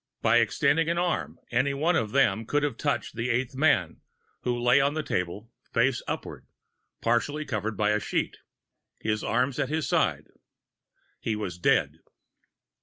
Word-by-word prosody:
By - - +5
extending 155 +4 +2
an 170 - 0
arm 175 0 -1
any 130 +4 +1
one 165 +5 +2
of 110 -6 +1
them 110 -4 +2
could 145 0 +1
have 145 - 0
touched 145 -1 -2
the 120 +2 -2
eighth 125 +2 0
man, 130 - +2 0.4
who 120 -1 -1
lay 125 +3 +4
on 140 +2 +1
the 155 - -1
table, 95 +4 -3 0.2
face 120 +1 +2
upward, - - -5 0.5
partly 145 +6 0
covered 105 -2 -3
by 105 0 +2
a 105 - +2
sheet, - - -2 0.6
his 110 -1 -1
arms 125 +3 0
at 135 - 0
his 155 -2 -1
sides. - - 0 0.9
He 110 - -2
was 90 -5 -5
dead. - - +2
125 Hz, 160 wpm, -27 LUFS, 110-145 Hz, 0.9 s, By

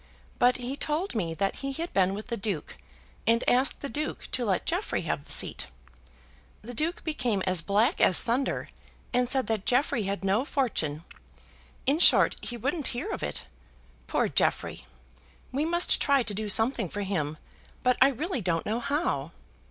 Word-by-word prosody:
But 245 0 +4
he 250 +2 -4
told 305 +5 -1
me 170 -8 -1
that 195 +3 -1
he 275 0 -4
had 335 +5 -4
been 190 0 +3
with 215 +4 -7
the 235 - -1
Duke, 200 -7 -3 0.5
and 230 +1 +3
asked 255 +3 +2
the 280 - -3
Duke 300 +2 -4
to 250 - 0
let 190 -4 0
Jeffrey - - -1
have - - -3
the - - -4
seat. - - +1 1.0
The 245 +3 -7
Duke 315 +8 -1
became 250 - -1
as 185 -2 +2
black 210 - +2
as 185 - +6
thunder, 255 +3 -1 0.4
and 245 0 +2
said 265 -1 +3
that 215 -2 -2
Jeffrey 250 -2 +2
had 195 0 -3
no 200 +6 +2
fortune. 170 - -1 0.8
In 285 +4 +3
short, - - +6
he 240 - -5
wouldn't 280 +6 -1
hear 395 - -3
of - - -4
it. - - -3 0.6
Poor - - +1
Jeffrey! - - 0 0.6
we 280 +4 0
must 345 +2 +2
try 280 -2 +3
to 220 - -4
do 210 +1 -3
something 225 -2 +2
for 205 - -4
him, 155 -6 -2 0.5
but 250 0 +4
I 265 - +9
really 285 - -2
don't 170 -3 0
know 220 +3 -1
how. 235 - -1
240 Hz, 175 wpm, -28 LUFS, 195-275 Hz, 1.0 s, I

